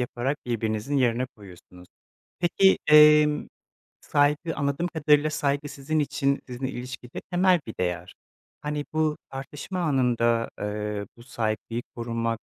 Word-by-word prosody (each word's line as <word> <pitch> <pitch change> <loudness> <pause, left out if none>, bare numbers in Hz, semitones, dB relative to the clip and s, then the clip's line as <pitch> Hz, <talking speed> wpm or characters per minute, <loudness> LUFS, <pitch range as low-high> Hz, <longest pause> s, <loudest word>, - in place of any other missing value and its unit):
yaparak 125 +3 -2
birbirinizin 115 +3 -1
yerine 125 -1 +2
koyuyorsunuz. 90 -5 -15 0.5
Peki, 190 +2 +4
emm, 150 0 +6 0.5
saygı 150 +3 +1
anladığım 140 +4 -1
kadarıyla 150 -2 +3
saygı 145 -1 -1
sizin 155 +3 -2
için, 140 -1 0
sizinle 130 +1 -4
ilişkide 125 -1 -7
temel 180 0 +4
bir 110 - -5
değer. 90 -1 -2 0.5
Hani, 150 0 -3
bu 155 -1 +1
tartışma 145 +7 -6
anında, 120 -6 +1
eee, 105 0 -3
bu 120 - -14
saygıyı 115 -1 -3
korumak 115 -1 -2
135 Hz, 120 wpm, -26 LUFS, 115-150 Hz, 0.5 s, emm